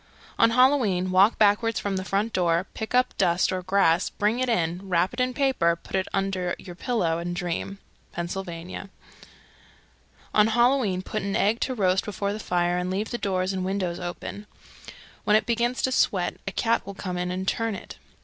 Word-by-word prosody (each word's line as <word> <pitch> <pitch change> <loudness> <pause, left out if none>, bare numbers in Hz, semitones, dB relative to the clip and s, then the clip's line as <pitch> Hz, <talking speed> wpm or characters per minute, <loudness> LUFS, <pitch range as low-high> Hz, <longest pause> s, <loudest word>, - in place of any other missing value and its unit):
On 230 - +6
Halloween 230 -7 +3
walk 195 +4 +5
backwards 215 +1 +3
from 200 -1 -2
the 190 - -2
front 205 +3 -1
door, 175 0 +2
pick 220 +2 -4
up 250 0 +2
dust 180 -2 +2
or 185 -1 -2
grass, 185 -2 +2
bring 215 +4 0
it 255 -1 0
in, 180 -2 -1
wrap 180 +1 +2
it - - -6
in 255 0 +1
paper, 255 -11 +2
put 170 - -8
it 190 -1 0
under 190 -2 -1
your 180 - -10
pillow, 175 -7 0
and 175 +1 -4
dream. 180 +2 -3 0.3
Pennsylvania. 175 +1 -5 1.4
311. - - +3
On 210 - +6
Halloween 240 -6 +2
put 215 - -3
an 200 0 -2
egg 220 +3 +2
to 260 - -1
roast 190 -3 +2
before 200 0 -3
the 215 - -5
fire 175 -2 0
and 180 0 -2
leave 200 +4 -2
the 240 - -3
doors 185 -1 -1
and 185 -1 -2
windows 185 -2 -2
open. 180 +3 -6 0.8
When 210 - +3
it 215 - +3
begins 240 +2 0
to 260 - +2
sweat 185 -7 +1
a - - -1
cat 230 +3 +1
will 200 0 -8
come 180 -2 -4
in 180 0 -2
and 185 +1 -3
turn 225 0 0
it. - - -10
195 Hz, 195 wpm, -25 LUFS, 180-220 Hz, 1.4 s, On